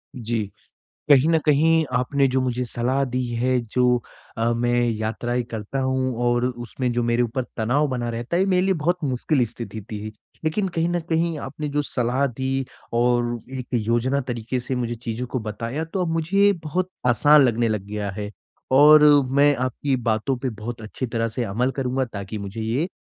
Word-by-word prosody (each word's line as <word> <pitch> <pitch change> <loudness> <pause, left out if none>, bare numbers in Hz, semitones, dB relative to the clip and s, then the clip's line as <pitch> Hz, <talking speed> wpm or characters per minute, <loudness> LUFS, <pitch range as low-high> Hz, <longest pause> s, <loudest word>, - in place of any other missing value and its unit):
जी। 115 -3 -2 0.7
कहीं 140 +1 +6
न 165 - +4
कहीं 160 +2 +4
आपने 130 +3 +2
जो 130 - +3
मुझे 125 -1 -1
सलाह 125 +3 0
दी 125 -1 -2
है, 125 +2 +2
जो 125 +1 +1 0.4
अ, 115 +1 +2
मैं 120 +1 +1
यात्राएँ 115 +3 -2
करता 110 +4 -4
हूँ 130 -1 0
और 120 0 +2
उसमें 125 +1 -3
जो 120 0 0
मेरे 120 +1 +2
ऊपर 120 +2 -1
तनाव 130 +7 +1
बना 125 -2 -2
रहता 120 +8 -3
है, 185 - +3
ये - - +1
मेरे 185 -1 +3
लिए 190 - +3
बहुत 175 +2 0
मुश्किल 130 0 +1
स्थिति 115 -1 -7
थी। 105 0 -5 0.3
लेकिन 190 +5 0
कहीं 170 -1 -1
न 175 0 0
कहीं, 165 -1 -1
आपने 145 +2 -5
जो 145 +1 0
सलाह 125 0 0
दी 135 +1 -2 0.3
और 120 0 +2 0.2
एक 125 - -6
योजना 120 +4 +1
तरीके 125 -1 -3
से 125 +2 -4
मुझे 120 -1 -2
चीज़ों 120 +1 -5
को 130 - -3
बताया, 115 +7 -4
तो 180 +3 -3
अब 175 - -1
मुझे 195 +5 +3
बहुत 180 +4 -1 0.2
आसान 145 +5 +6
लगने 120 -2 +2
लग 105 -3 -2
गया 105 -1 -3
है, 105 +1 -5 0.4
और 150 +3 +8 0.3
मैं 145 +2 +4
आपकी 130 +2 -1
बातों 110 +5 0
पे 130 0 -2
बहुत 115 +1 -6
अच्छी 110 +4 -5
तरह 115 -1 -1
से 115 +2 -3
अमल 115 +5 0
करूँगा, 130 0 0
ताकि 105 -3 -6
मुझे 100 +2 -6
ये 120 +10 -1
125 Hz, 190 wpm, -23 LUFS, 115-140 Hz, 0.7 s, और